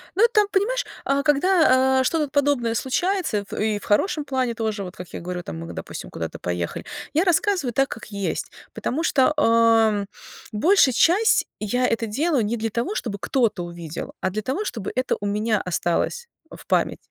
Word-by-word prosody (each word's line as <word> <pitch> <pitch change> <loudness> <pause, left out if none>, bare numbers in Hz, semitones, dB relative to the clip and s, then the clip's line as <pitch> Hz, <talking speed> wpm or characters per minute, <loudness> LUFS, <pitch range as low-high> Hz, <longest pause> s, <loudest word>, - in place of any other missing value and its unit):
Ну, 405 - +4
там, 420 -2 +4
понимаешь, - - +1 0.2
а, 275 0 +1
когда, 280 -4 +4
а, - - +3
что-то 300 +2 0
подобное 280 -5 +1
случается 270 - -1
в - - -9
и 215 -1 0
в - - -16
хорошем 295 - +1
плане 260 -4 -1
тоже, 220 -3 -2
вот 180 -1 -8
как 180 - -8
я - - -5
говорю, 180 +1 -4
там, 165 - -7
мы, 165 0 -7
допустим, - - -7
куда-то 80 -1 -5
поехали. 90 -1 -3 0.3
Я 320 +4 +3
рассказываю 355 - +1
так, 270 +2 +2
как 225 - -8
есть, 200 -2 -3 0.2
потому 310 +6 -2
что, 275 -2 +3
ам, 225 -5 +4 0.4
большая 275 - +4
часть 375 - +4
я 245 +4 0
это 230 0 -1
делаю 275 +4 +1
не 220 +3 -1
для 225 0 -2
того, 235 - -2
чтобы 215 - -3
кто-то 225 -7 0
увидел, 170 -2 -7
а - - 0
для 210 +3 -3
того, 270 - -2
чтобы 225 - -4
это 255 +1 0
у 205 - -5
меня 210 +1 0
осталось 180 - -1 0.3
в - - -12
памяти. - - +1
240 Hz, 185 wpm, -23 LUFS, 205-305 Hz, 0.4 s, Ну